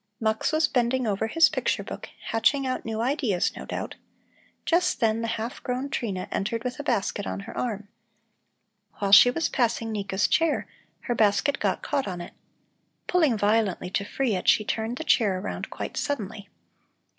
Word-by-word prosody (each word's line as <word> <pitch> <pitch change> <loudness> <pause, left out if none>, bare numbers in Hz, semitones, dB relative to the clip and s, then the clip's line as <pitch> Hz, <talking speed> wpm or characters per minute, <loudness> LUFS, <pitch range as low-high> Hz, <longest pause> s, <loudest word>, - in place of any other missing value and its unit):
Mux 220 -1 0
was 310 0 +3
bending 250 0 +1
over 210 0 0
his 330 +7 +5
picture - - -1
book, - - -8 0.2
hatching 230 +5 +2
out 255 0 -2
new 220 0 -2
ideas, 245 - 0
no - - -7
doubt. - - -5 0.7
Just 355 +2 +2
then 225 -1 +2
the 230 - -2
half 225 +3 -5
grown 255 +3 -3
Trina 195 -9 -3
entered 225 +3 -2
with 250 +1 -4
a - - -3
basket 235 - -1
on 95 +1 -4
her - - -9
arm. 210 -4 -3 1.1
While 200 -1 -1
she 205 +5 +10
was 325 +6 0
passing 230 -2 0
Nika's 200 -1 0
chair, 325 -2 +2 0.4
her 240 - -2
basket 220 +6 +2
got - - -1
caught 280 -4 -1
on 180 -2 -4
it. 175 - -8 0.7
Pulling 315 -10 +2
violently 205 -3 +1
to 200 - 0
free 245 +3 -1
it, 180 - -4
she 215 - +4
turned 225 +3 -2
the 320 - -4
chair 205 -11 +3
around 185 - -5
quite - - -6
suddenly. 210 -7 -3
225 Hz, 175 wpm, -26 LUFS, 205-260 Hz, 1.1 s, she